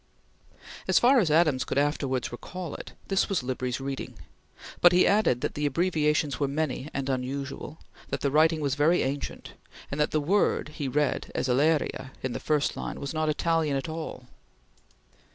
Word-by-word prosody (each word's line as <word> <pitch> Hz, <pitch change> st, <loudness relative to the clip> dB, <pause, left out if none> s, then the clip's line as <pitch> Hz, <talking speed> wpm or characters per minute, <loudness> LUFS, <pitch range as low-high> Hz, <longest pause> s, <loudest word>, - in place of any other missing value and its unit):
As -, -, +4 dB
far 255 Hz, +2 st, +6 dB
as 185 Hz, -8 st, +2 dB
Adams 150 Hz, -4 st, +3 dB
could 125 Hz, -, -3 dB
afterwards 140 Hz, -3 st, 0 dB
recall 175 Hz, +7 st, -7 dB
it, -, -, -8 dB
this 195 Hz, -1 st, +1 dB
was 190 Hz, -9 st, 0 dB
Libri's 125 Hz, 0 st, -2 dB
reading, 135 Hz, 0 st, -5 dB, 0.7 s
but 175 Hz, 0 st, +7 dB
he 180 Hz, -, +5 dB
added 200 Hz, -, +3 dB
that -, -, -2 dB
the 150 Hz, 0 st, 0 dB
abbreviations 150 Hz, -2 st, +1 dB
were 140 Hz, -, +1 dB
many 145 Hz, -1 st, -2 dB
and 135 Hz, -1 st, -3 dB
unusual; 135 Hz, +3 st, -4 dB, 0.3 s
that -, -, -3 dB
the 140 Hz, -, +1 dB
writing 155 Hz, +2 st, +4 dB
was 140 Hz, -2 st, 0 dB
very 155 Hz, +5 st, +3 dB
ancient; 140 Hz, +2 st, -4 dB, 0.4 s
and 140 Hz, +2 st, -1 dB
that 150 Hz, -, +2 dB
the 155 Hz, -, +1 dB
word 180 Hz, +2 st, +1 dB
he 150 Hz, -2 st, -4 dB
read 145 Hz, +1 st, 0 dB
as -, -, 0 dB
"elleria" 135 Hz, 0 st, +1 dB
in 130 Hz, -2 st, -2 dB
the -, -, -3 dB
first 150 Hz, -2 st, 0 dB
line -, -, -5 dB
was 140 Hz, +1 st, -4 dB
not 155 Hz, -1 st, 0 dB
Italian 160 Hz, -1 st, +1 dB
at 135 Hz, -, -4 dB
all. 160 Hz, -5 st, -6 dB
150 Hz, 175 wpm, -27 LUFS, 135-160 Hz, 0.7 s, but